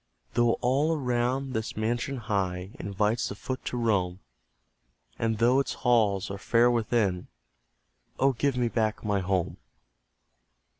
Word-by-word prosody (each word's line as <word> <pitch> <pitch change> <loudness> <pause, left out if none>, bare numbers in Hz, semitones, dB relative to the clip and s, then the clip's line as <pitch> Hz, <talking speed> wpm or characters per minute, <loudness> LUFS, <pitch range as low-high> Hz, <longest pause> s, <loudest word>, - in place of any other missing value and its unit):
Though 120 -1 +3
all 145 +6 +2
around 130 0 -1
this 110 -2 -3
mansion 120 +5 -1
high 95 -5 -2
Invites 105 +2 0
the - - -6
foot 130 +4 -5
to 125 - -3
roam, 95 -6 0 1.0
And 115 -1 0
though 120 +4 +4
its 140 - -1
halls 105 -6 +3
are 100 - -5
fair 120 +3 +3
within 110 -6 0 0.9
Oh, 135 0 +3
give 135 +1 0
me 120 -1 +2
back 110 -2 -1
my 100 -1 +1
HOME! 95 -2 -1
115 Hz, 135 wpm, -28 LUFS, 100-125 Hz, 1.0 s, though